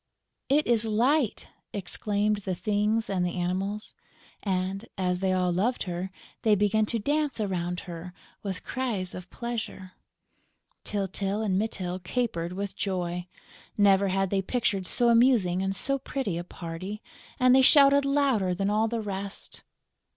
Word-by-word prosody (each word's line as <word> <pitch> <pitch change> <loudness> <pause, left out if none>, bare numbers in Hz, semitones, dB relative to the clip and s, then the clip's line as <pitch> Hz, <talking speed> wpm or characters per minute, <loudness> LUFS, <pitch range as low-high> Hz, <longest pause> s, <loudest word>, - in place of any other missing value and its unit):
"It 295 +3 +4
is 230 -2 +3
Light!" 235 +4 +1 0.3
exclaimed 205 +2 0
the 190 -2 -3
Things 210 +3 0
and 190 -2 0
the 175 -1 -1
Animals; 190 +4 -2 0.5
and, 190 0 -1
as 180 -1 0
they 190 0 +1
all 180 -1 +2
loved 215 +8 0
her, 180 +1 -4 0.3
they 215 -2 +4
began 210 +2 +2
to 230 - -1
dance 290 +2 0
around 180 -4 -2
her 175 0 -8 0.3
with 195 -3 -5
cries 225 -8 -2
of 180 0 -8
pleasure. 225 -6 -5 0.9
Tyltyl 200 +1 -2
and 195 -4 +1
Mytyl 185 -4 -2
capered 180 -3 -2
with 200 +1 -4
joy. 180 -2 -2 0.5
Never 200 -1 +5
had 195 0 0
they 195 -1 +2
pictured 195 -3 -1
so 240 -1 +2
amusing 230 -7 +4
and 195 0 -1
so 275 +6 +1
pretty 260 -8 -3
a 170 - -3
party; 180 +5 -7 0.4
and 255 0 +6
they 265 - +7
shouted 280 +1 +7
louder 275 -10 +2
than 195 +2 0
all 215 +2 +2
the 230 0 -2
rest. 200 -1 -3
200 Hz, 150 wpm, -27 LUFS, 185-230 Hz, 0.9 s, they